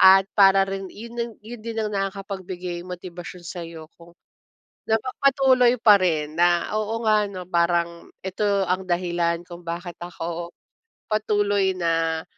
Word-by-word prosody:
at 190 Hz, +1 st, +8 dB
para 195 Hz, -1 st, +6 dB
rin 195 Hz, 0 st, -4 dB
yun 235 Hz, +1 st, -6 dB
yun 235 Hz, +1 st, -9 dB
din 225 Hz, 0 st, -5 dB
ang 215 Hz, -1 st, -1 dB
nakakapagbigay 190 Hz, -3 st, -4 dB
motibasyon 180 Hz, 0 st, -8 dB
sayo 165 Hz, -3 st, -7 dB
kung 170 Hz, 0 st, -16 dB, 0.8 s
napapatuloy 255 Hz, +1 st, +3 dB
pa 210 Hz, -3 st, +7 dB
rin 155 Hz, -4 st, 0 dB
na, 175 Hz, +1 st, +3 dB
"Oo 220 Hz, +2 st, -2 dB
nga 215 Hz, -1 st, +4 dB
'no 185 Hz, -2 st, -7 dB
parang 170 Hz, -1 st, 0 dB, 0.2 s
ito 190 Hz, +3 st, -2 dB, 0.2 s
ang 185 Hz, +1 st, 0 dB
dahilan 175 Hz, -1 st, 0 dB
kung 175 Hz, 0 st, -10 dB
bakit 170 Hz, +1 st, -5 dB
ako 170 Hz, 0 st, -5 dB, 0.6 s
patuloy 205 Hz, -2 st, +2 dB
na 165 Hz, -2 st, 0 dB
185 Hz, 130 wpm, -24 LUFS, 170-210 Hz, 0.8 s, at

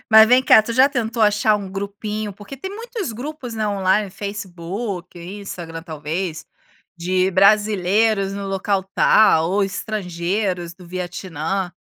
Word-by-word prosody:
Mas 220 Hz, 0 st, +9 dB
vem 255 Hz, +1 st, +5 dB
cá, 220 Hz, -, +7 dB
tu 230 Hz, -, -4 dB
já 260 Hz, +4 st, +5 dB
tentou 230 Hz, -4 st, -1 dB
achar 210 Hz, 0 st, +3 dB
um 195 Hz, -2 st, -7 dB
grupinho? 205 Hz, +1 st, -4 dB
Porque 205 Hz, +7 st, -10 dB
tem 380 Hz, +9 st, -6 dB
muitos 455 Hz, -, -5 dB
grupos, 250 Hz, 0 st, -6 dB
né, 215 Hz, -1 st, -1 dB
online, 195 Hz, 0 st, +1 dB
Facebook, 195 Hz, -2 st, -6 dB
Instagram 175 Hz, -3 st, -7 dB
talvez, 160 Hz, +1 st, -4 dB, 0.5 s
de 185 Hz, +2 st, +1 dB
brasileiros 200 Hz, +1 st, +3 dB
no 200 Hz, 0 st, -5 dB
local 195 Hz, 0 st, 0 dB
tal 165 Hz, -6 st, +5 dB
ou 200 Hz, +2 st, +2 dB
estrangeiros 185 Hz, -2 st, -3 dB
do 180 Hz, 0 st, -15 dB
Vietnã. 180 Hz, 0 st, -4 dB
200 Hz, 135 wpm, -21 LUFS, 180-215 Hz, 0.5 s, Mas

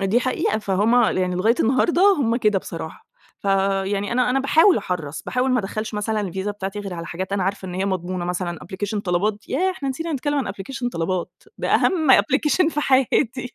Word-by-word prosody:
دي 195 Hz, +5 st, +2 dB
حقيقة، 250 Hz, -4 st, 0 dB
فهُم 210 Hz, +2 st, +1 dB, 0.2 s
يعني 185 Hz, -1 st, 0 dB
لغاية 215 Hz, +6 st, +3 dB
النهارده 345 Hz, -, +3 dB
هُم 235 Hz, -4 st, +1 dB
كده 210 Hz, -5 st, +2 dB
بصراحة، -, -, -8 dB, 0.4 s
فيعني 195 Hz, +1 st, 0 dB
أنا 250 Hz, +1 st, +2 dB
أنا 270 Hz, +2 st, +2 dB
باحاول 320 Hz, +8 st, +5 dB
أحرَّص، 160 Hz, -5 st, -4 dB
باحاول 255 Hz, +1 st, -1 dB
ما 250 Hz, -1 st, +2 dB
أدخّلش 215 Hz, +2 st, -5 dB
مثلًا 210 Hz, +1 st, -1 dB
الفيزا 190 Hz, +1 st, -3 dB
بتاعتي 200 Hz, 0 st, -5 dB
غير 195 Hz, -3 st, -5 dB
على 170 Hz, -1 st, -6 dB
حاجات 185 Hz, +3 st, -5 dB
أنا 200 Hz, -1 st, 0 dB
عارفة 195 Hz, 0 st, -3 dB
إن 180 Hz, -, -6 dB
هي 190 Hz, +1 st, -1 dB
مضمونة، 185 Hz, -2 st, -2 dB
مثلًا 175 Hz, -1 st, -3 dB
أبلكيشن 205 Hz, +3 st, -4 dB
طلبات 205 Hz, +3 st, -1 dB
ياه! 365 Hz, +8 st, +1 dB
إحنا 330 Hz, -7 st, -5 dB
نسينا 325 Hz, +5 st, -3 dB
نتكلّم 290 Hz, +1 st, -1 dB
عن 265 Hz, -, -1 dB
أبلكيشن 245 Hz, +5 st, -4 dB
طلبات 175 Hz, -3 st, -3 dB, 0.2 s
ده -, -, +1 dB
أهم 320 Hz, -7 st, +3 dB
application 300 Hz, +5 st, +3 dB
في 300 Hz, -, -2 dB
حياتي 260 Hz, -2 st, +1 dB
210 Hz, 190 wpm, -22 LUFS, 190-260 Hz, 0.4 s, باحاول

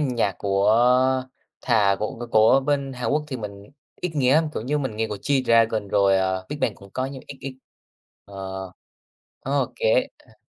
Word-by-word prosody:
nhạc 120 Hz, -9 st, 0 dB
của 100 Hz, +2 st, +2 dB, 0.9 s
thà 105 Hz, -5 st, +3 dB
của 105 Hz, -, -3 dB
của 120 Hz, -, -6 dB
của 110 Hz, +5 st, +5 dB
bên 140 Hz, -1 st, -1 dB
Hàn 125 Hz, -2 st, -3 dB
Quốc 150 Hz, +1 st, 0 dB
thì 130 Hz, -3 st, -5 dB
mình 100 Hz, 0 st, -9 dB, 0.3 s
ít 180 Hz, -, -2 dB
nghe 135 Hz, -1 st, +3 dB
lắm, 160 Hz, 0 st, +3 dB
kiểu -, -, -3 dB
như, 145 Hz, +5 st, -1 dB
mình 130 Hz, -7 st, -3 dB
nghe 110 Hz, 0 st, -1 dB
của 105 Hz, -, -4 dB
G-Dragon, 115 Hz, -4 st, +2 dB
rồi, 100 Hz, -1 st, +3 dB
ờ, 95 Hz, 0 st, -1 dB
Big 150 Hz, -, -6 dB
Bang 105 Hz, -, 0 dB
cũng 100 Hz, -, -16 dB
có 130 Hz, -, -2 dB
nhưng 135 Hz, -1 st, -8 dB
ít 140 Hz, -, -9 dB
ít, 130 Hz, -1 st, -7 dB, 0.7 s
ờ. 95 Hz, -1 st, -7 dB, 0.7 s
Ô -, -, -1 dB
kê, -, -, +2 dB
ờ. -, -, -23 dB
115 Hz, 190 wpm, -23 LUFS, 100-135 Hz, 0.9 s, của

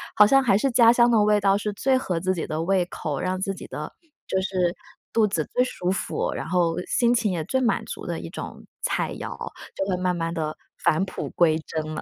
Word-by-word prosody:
好 210 Hz, -, +8 dB
像 270 Hz, +5 st, +5 dB
还 210 Hz, -6 st, +3 dB
是 270 Hz, +4 st, +1 dB
家 235 Hz, -1 st, +7 dB
乡 240 Hz, 0 st, +4 dB
的 220 Hz, -2 st, +5 dB
味 210 Hz, 0 st, +4 dB
道 195 Hz, 0 st, +4 dB
是 210 Hz, 0 st, -3 dB
最 260 Hz, +5 st, +2 dB
合 180 Hz, -9 st, -2 dB
自 185 Hz, 0 st, +1 dB
己 170 Hz, -, -4 dB
的 155 Hz, +1 st, -2 dB
胃 185 Hz, 0 st, +2 dB
口， 150 Hz, -5 st, -4 dB
让 185 Hz, 0 st, -1 dB
自 195 Hz, 0 st, -2 dB
己 -, -, -10 dB
的 -, -, -6 dB, 0.3 s
就 190 Hz, -, 0 dB
是 180 Hz, -2 st, 0 dB, 0.4 s
肚 220 Hz, -2 st, +3 dB
子 165 Hz, -6 st, -1 dB
最 250 Hz, -, +3 dB
舒 180 Hz, -6 st, -2 dB
服， 195 Hz, -, -2 dB
然 -, -, -5 dB
后 170 Hz, -2 st, +1 dB
心 240 Hz, 0 st, +3 dB
情 220 Hz, -5 st, +1 dB
也 165 Hz, -3 st, -2 dB
最 260 Hz, +10 st, 0 dB
满 240 Hz, -3 st, +1 dB
足 -, -, -7 dB
的 -, -, -2 dB
一 -, -, -7 dB
种 -, -, -8 dB, 0.2 s
菜 -, -, -1 dB
肴， -, -, -6 dB, 0.4 s
就 195 Hz, -, -1 dB
会 180 Hz, -, +1 dB
慢 180 Hz, -1 st, +1 dB
慢 165 Hz, 0 st, -2 dB
地 155 Hz, -2 st, -3 dB, 0.3 s
返 160 Hz, +5 st, +2 dB
璞 195 Hz, -, -5 dB
归 160 Hz, -2 st, +3 dB
真 155 Hz, -1 st, -3 dB
了。 -, -, -4 dB
190 Hz, 255 characters per minute, -24 LUFS, 170-215 Hz, 0.4 s, 好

